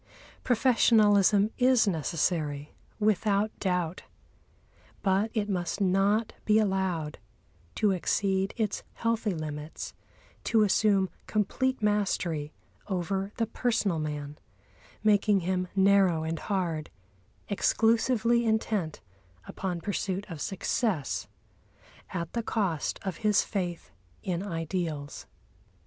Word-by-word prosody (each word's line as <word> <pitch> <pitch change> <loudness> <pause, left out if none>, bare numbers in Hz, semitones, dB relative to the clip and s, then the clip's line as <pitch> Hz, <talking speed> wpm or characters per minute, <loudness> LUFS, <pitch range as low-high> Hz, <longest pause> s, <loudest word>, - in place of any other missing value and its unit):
Professionalism 215 -4 +4
is 250 -3 +4
necessary, 155 -3 -1 0.3
without 210 0 +2
doubt; 180 -2 -1 1.0
but 195 +3 +2
it 210 -2 0
must 180 -2 -2
not 200 +3 +2
be 215 0 +4
allowed 190 -7 0 0.6
to 210 -2 +2
exceed 190 +1 0
its 215 -3 -1
healthy 230 -1 0
limits, 155 0 -6 0.5
to 225 -2 +3
assume 200 -1 +3 0.2
complete 240 +4 0
mastery 185 -7 0 0.4
over 190 +1 -2
the 230 - +1
personal 220 -7 0
man, 150 -1 -5 0.6
making 205 -2 +4
him 180 +1 -1
narrow 190 -4 +4
and 160 0 -3
hard, 170 -6 -1 0.6
exclusively 230 +3 +2
intent 220 -7 -1 0.4
upon 180 -3 -4
pursuit 195 +1 -2
of 160 -3 -6
success 195 - -1 0.8
at 170 -2 -4
the 235 - 0
cost 195 -9 -1
of 190 -4 -3
his 210 -2 +3
faith 175 -5 -4 0.3
in 180 -2 -2
ideals. 165 -5 -4
195 Hz, 100 wpm, -28 LUFS, 170-215 Hz, 1.0 s, Professionalism